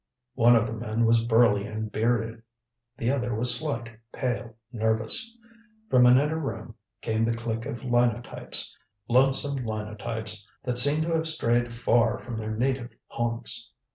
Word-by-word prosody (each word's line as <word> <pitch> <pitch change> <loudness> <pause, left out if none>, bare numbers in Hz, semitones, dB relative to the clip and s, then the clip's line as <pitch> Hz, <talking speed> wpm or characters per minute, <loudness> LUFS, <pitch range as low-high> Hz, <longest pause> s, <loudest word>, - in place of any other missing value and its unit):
One 120 -1 +5
of 115 -1 +3
the 115 - -5
men 115 0 -1
was 115 0 +3
burly 110 -3 +3
and 110 0 -5
bearded; 115 0 -1 0.6
the 120 +1 0
other 120 -4 -1
was 120 +3 +5
slight, 120 -7 -3 0.2
pale, 120 -3 -4 0.2
nervous. 110 - -1 0.5
From 125 -1 +6
an 125 +1 +7
inner 150 +4 0
room 115 -6 -5 0.3
came 110 0 -1
the 115 0 0
click 115 0 -4
of 120 -4 -6
linotypes 120 -1 0 0.3
lonesome 135 +2 +3
linotypes 110 -1 -4 0.2
that 125 -1 +2
seemed 145 +4 +6
to 165 +1 -2
have 160 0 0
strayed 120 -6 0
far 115 -1 +1
from 115 +3 -8
their 110 0 -4
native 125 +1 -1 0.2
haunts. 120 0 -2
115 Hz, 150 wpm, -26 LUFS, 110-125 Hz, 0.6 s, an